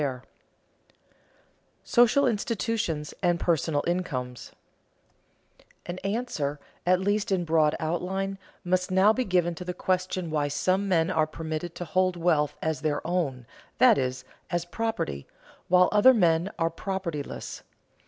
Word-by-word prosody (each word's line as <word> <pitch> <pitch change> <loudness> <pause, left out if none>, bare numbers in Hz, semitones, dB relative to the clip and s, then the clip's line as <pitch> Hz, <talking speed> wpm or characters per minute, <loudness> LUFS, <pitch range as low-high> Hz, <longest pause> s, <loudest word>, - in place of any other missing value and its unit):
[Sidenote: 130 -3 -2 1.6
Social 245 +4 +4
institutions 215 - -1
and 175 -2 +2
personal 160 -4 +1
incomes] 130 -9 -3 1.3
An 175 +1 -5
answer, 195 - -2 0.3
at 180 0 +4
least 205 +3 0
in 180 -2 +1
broad 155 -2 +3
outline, 190 +4 -2 0.2
must 180 0 0
now 190 +3 +5
be 255 - 0
given 180 -5 +1
to 170 - -7
the 180 0 -5
question 185 -2 -1
why 150 -2 +1
some 185 +7 0
men 165 -1 +2
are 155 -3 +2
permitted 160 +2 -5
to 175 - -5
hold 185 +2 +1
wealth 160 -4 +1
as 155 -1 -1
their 150 -2 -1
"own," 150 -8 -1 0.3
that - - +6
is, 130 -1 -3 0.2
as 175 -1 -1
"property," 175 - -3 0.4
while 180 0 +5
other 230 +5 +6
men 170 -2 +3
are 165 0 0
propertyless. 170 -5 -5
175 Hz, 135 wpm, -27 LUFS, 155-190 Hz, 1.6 s, that